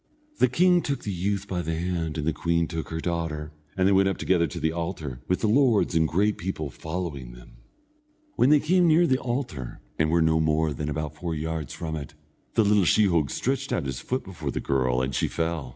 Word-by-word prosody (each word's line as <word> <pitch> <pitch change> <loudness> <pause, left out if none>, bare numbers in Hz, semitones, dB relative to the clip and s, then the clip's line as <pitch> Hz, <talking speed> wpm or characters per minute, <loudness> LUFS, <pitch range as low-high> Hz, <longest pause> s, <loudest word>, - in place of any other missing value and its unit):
The - - +6
king 175 +7 +4
took 140 -3 -3
the 105 - -3
youth 100 +2 -2
by 90 -3 -2
the 80 0 -2
hand, 85 -2 -2
and 75 - -2
the 80 - +1
queen 85 0 0
took 80 -2 -5
her 80 - -3
daughter, 80 -3 -3 0.3
and 95 0 +3
they - - +4
went 95 0 +4
up 95 - -2
together 85 -3 +2
to - - -6
the 80 - +1
altar, 80 -6 -4
with 90 - 0
the 110 - +2
lords 115 -4 +3
and 80 -1 +3
great 100 +6 +1
people 80 -5 -4
following 80 -5 -5
them. - - -15 0.8
When 130 - +4
they 150 0 +6
came 180 +2 +3
near 165 +2 +5
the 130 -4 +2
altar, 120 - -4 0.2
and 80 - +3
were 85 0 +3
no 80 0 +3
more 80 0 +1
than 75 +2 -4
about 75 0 -3
four 85 +1 -4
yards 80 0 -4
from 80 -2 -4
it, 75 -3 -7 0.4
the 110 - +4
little 105 -1 +4
sheehogue 85 -6 +3
stretched - - -2
out - - 0
his 65 -2 -3
foot 130 +1 -3
before 80 -6 -6
the - - -2
girl, 65 -2 +1
and 65 +1 -2
she - - +1
fell. 80 -5 -2
85 Hz, 225 wpm, -26 LUFS, 75-100 Hz, 0.8 s, The